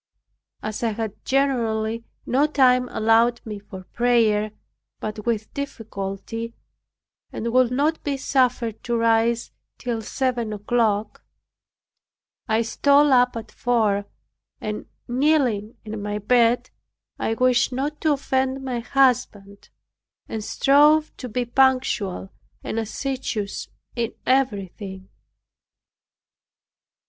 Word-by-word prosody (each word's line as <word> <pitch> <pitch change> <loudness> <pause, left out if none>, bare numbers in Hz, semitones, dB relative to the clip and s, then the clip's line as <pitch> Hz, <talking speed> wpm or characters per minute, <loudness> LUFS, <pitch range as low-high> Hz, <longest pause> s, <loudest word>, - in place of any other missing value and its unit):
As 215 0 -4
I 230 -2 0
had 220 -1 -5
generally 230 -5 0 0.2
no 275 +5 +2
time 255 -4 +3
allowed 225 +2 +3
me 210 -2 -6
for 195 -2 -10
prayer 220 -1 +2 0.5
but 215 +1 -6
with 220 -2 -1
difficulty, 225 -3 -5 0.8
and 230 +1 -3
would 255 -1 +5
not 290 +6 0
be 280 -2 -1
suffered 250 -4 0
to 235 -1 0
rise 230 +1 +2 0.3
till 235 -2 -3
seven 240 -1 -1
o'clock, 210 0 0 1.2
I 220 +1 +2
stole 285 +5 +4
up 250 -1 +4
at 225 -1 -8
four, 215 -5 +1 0.5
and 210 0 -5 0.2
kneeling 245 -5 +1
in 215 -1 -5
my 205 0 -3
bed, 240 +3 +2 0.5
I 225 - 0
wished 250 +1 +3
not 280 +4 -3
to 310 -2 +3
offend 265 -1 -1
my 250 -2 -2
husband 230 -6 0 0.6
and 220 -1 -4
strove 295 +6 +4
to 250 - -6
be 245 +3 -1
punctual 240 -7 +1 0.3
and 225 - -2
assiduous 225 -2 -3 0.3
in 235 -2 -2
everything. 200 -7 -1
235 Hz, 110 wpm, -23 LUFS, 215-260 Hz, 1.2 s, would